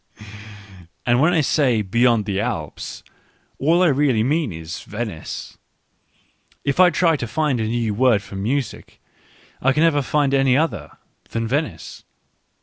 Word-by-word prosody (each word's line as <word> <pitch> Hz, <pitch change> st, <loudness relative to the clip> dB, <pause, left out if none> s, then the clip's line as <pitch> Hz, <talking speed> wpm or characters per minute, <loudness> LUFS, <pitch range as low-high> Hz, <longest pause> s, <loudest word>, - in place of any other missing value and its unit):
And 120 Hz, 0 st, +3 dB
when 160 Hz, +4 st, +4 dB
I 165 Hz, -3 st, +3 dB
say 130 Hz, -6 st, +2 dB
beyond 115 Hz, +2 st, +2 dB
the 100 Hz, -2 st, -2 dB
Alps, 100 Hz, -9 st, -5 dB, 0.6 s
all 165 Hz, +6 st, +3 dB
I -, -, +5 dB
really 135 Hz, -6 st, +2 dB
mean 145 Hz, -, 0 dB
is 80 Hz, +2 st, -7 dB
Venice. 105 Hz, -7 st, -6 dB, 1.0 s
If 140 Hz, +4 st, -1 dB
I 185 Hz, -1 st, +8 dB
try 165 Hz, 0 st, +2 dB
to 120 Hz, -5 st, -4 dB
find 140 Hz, +1 st, 0 dB
a 110 Hz, -, -1 dB
new 115 Hz, -1 st, -1 dB
word 115 Hz, -2 st, +3 dB
for -, -, -11 dB
music, 120 Hz, +6 st, -3 dB, 0.6 s
I 135 Hz, +1 st, +3 dB
can 150 Hz, +3 st, +2 dB
never 155 Hz, -3 st, +3 dB
find 140 Hz, 0 st, 0 dB
any 135 Hz, -1 st, +3 dB
other 115 Hz, -, -2 dB, 0.3 s
than 115 Hz, 0 st, -2 dB
Venice. 145 Hz, +6 st, -3 dB
125 Hz, 145 wpm, -21 LUFS, 110-150 Hz, 1.0 s, I